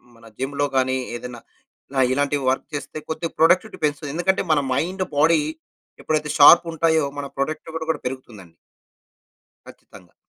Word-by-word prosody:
మన 115 Hz, 0 st, -19 dB
జిమ్‌లో 140 Hz, +2 st, -1 dB
గాని 130 Hz, 0 st, +2 dB, 0.2 s
ఏదైనా, 120 Hz, 0 st, -8 dB
ఆహ్, 135 Hz, -, -15 dB
ఇలా -, -, +4 dB
ఇలాంటివి 145 Hz, +1 st, 0 dB
వర్క్ 130 Hz, -, -1 dB
చేస్తే 145 Hz, -, -6 dB
కొద్దిగా 165 Hz, +1 st, -3 dB
ప్రొడక్టివిటీ 180 Hz, +6 st, +3 dB
పెంచుతుంది. 145 Hz, -1 st, -1 dB
ఎందుకంటే 190 Hz, +3 st, +1 dB
మన 155 Hz, -, +4 dB
మైండ్, 185 Hz, +7 st, -1 dB
బాడీ 160 Hz, +2 st, +4 dB, 0.6 s
ఎప్పుడైతే 150 Hz, -1 st, -1 dB
షార్ప్ 170 Hz, +4 st, +8 dB
ఉంటాయో 160 Hz, -2 st, +2 dB
మన 140 Hz, -, -4 dB
ప్రొడక్టివిటీ 160 Hz, +3 st, -4 dB
కూడా 160 Hz, -2 st, 0 dB
పెరుగుతుందండి. 120 Hz, -9 st, -7 dB, 1.2 s
ఖచ్చితంగా. -, -, -16 dB
150 Hz, 140 wpm, -22 LUFS, 135-160 Hz, 1.2 s, షార్ప్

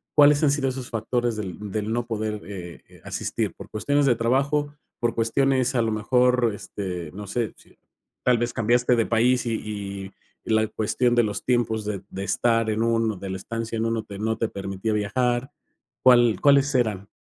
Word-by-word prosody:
¿cuáles 145 Hz, -1 st, +6 dB
han 145 Hz, -, +5 dB
sido 140 Hz, -2 st, +1 dB
esos 130 Hz, -1 st, -6 dB
factores 120 Hz, +1 st, -1 dB
del 105 Hz, 0 st, -6 dB
del 105 Hz, +1 st, -2 dB
no 120 Hz, +1 st, -1 dB
poder, 110 Hz, -2 st, -3 dB
eh, 90 Hz, -4 st, -8 dB
eh, -, -, -19 dB
asistir? -, -, -3 dB
Por -, -, -11 dB
cuestiones 145 Hz, +6 st, +1 dB
de 125 Hz, -4 st, +4 dB
trabajo, 140 Hz, +5 st, +1 dB, 0.3 s
por 120 Hz, -1 st, 0 dB
cuestiones 130 Hz, +3 st, +1 dB
a 120 Hz, -, +3 dB
lo 115 Hz, -, 0 dB
mejor, 125 Hz, +2 st, +2 dB
este, 90 Hz, -6 st, -6 dB
no 105 Hz, +1 st, -8 dB
sé, 115 Hz, +3 st, -2 dB
si -, -, -22 dB, 0.5 s
tal 125 Hz, -1 st, +4 dB
vez 120 Hz, 0 st, -1 dB
cambiaste 120 Hz, +2 st, +2 dB
de 115 Hz, -2 st, +2 dB
país, 125 Hz, +2 st, +2 dB
y 100 Hz, -4 st, -4 dB, 0.3 s
y -, -, -3 dB
la 110 Hz, 0 st, +3 dB
cuestión 120 Hz, +3 st, 0 dB
de 120 Hz, -, +5 dB
los 105 Hz, -2 st, -3 dB
tiempos 115 Hz, -3 st, +1 dB
de 105 Hz, -2 st, -3 dB
de 95 Hz, -, -5 dB
estar 115 Hz, +2 st, +1 dB
en 110 Hz, +1 st, 0 dB
un 115 Hz, -2 st, +1 dB
de 95 Hz, -, -6 dB
la 95 Hz, -, -3 dB
estancia 115 Hz, +3 st, -4 dB
en 110 Hz, -, 0 dB
uno 115 Hz, -1 st, -1 dB
que 100 Hz, -, -9 dB
no 110 Hz, +1 st, -1 dB
te 115 Hz, -, -1 dB
permitía 100 Hz, +2 st, -3 dB
viajar. 120 Hz, +5 st, 0 dB, 0.5 s
¿Cuál 120 Hz, -3 st, +6 dB
cuáles 140 Hz, 0 st, +4 dB
eran? 105 Hz, -6 st, 0 dB
115 Hz, 190 wpm, -24 LUFS, 105-125 Hz, 0.5 s, cuáles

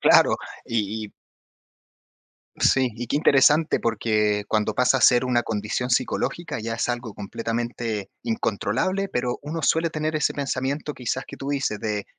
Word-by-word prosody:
Claro. -, -, +6 dB, 0.3 s
Y 110 Hz, -1 st, -2 dB
y -, -, -18 dB, 1.5 s
Sí. 130 Hz, -2 st, +3 dB
Y 120 Hz, 0 st, -5 dB
qué -, -, -1 dB
interesante, 150 Hz, +2 st, +4 dB
porque 105 Hz, -2 st, +1 dB
cuando 110 Hz, -1 st, +1 dB
pasa 125 Hz, +3 st, +3 dB
a -, -, -3 dB
ser 125 Hz, 0 st, +6 dB
una 120 Hz, -2 st, +1 dB
condición 110 Hz, +4 st, -2 dB
psicológica, 150 Hz, +4 st, -1 dB
ya 115 Hz, +1 st, -3 dB
es 115 Hz, -, -1 dB
algo 120 Hz, -3 st, -3 dB
completamente 115 Hz, 0 st, -3 dB
incontrolable. 120 Hz, -, -1 dB
Pero 125 Hz, -4 st, -2 dB
uno 160 Hz, +2 st, -4 dB
suele 160 Hz, +2 st, +2 dB
tener 155 Hz, 0 st, -2 dB
ese 150 Hz, -, +1 dB
pensamiento 140 Hz, +2 st, -2 dB
quizás 130 Hz, +1 st, -3 dB
que -, -, -10 dB
tú 135 Hz, -, -5 dB
dices 135 Hz, -7 st, -1 dB
de, 105 Hz, -2 st, -2 dB
120 Hz, 155 wpm, -24 LUFS, 110-140 Hz, 1.5 s, Claro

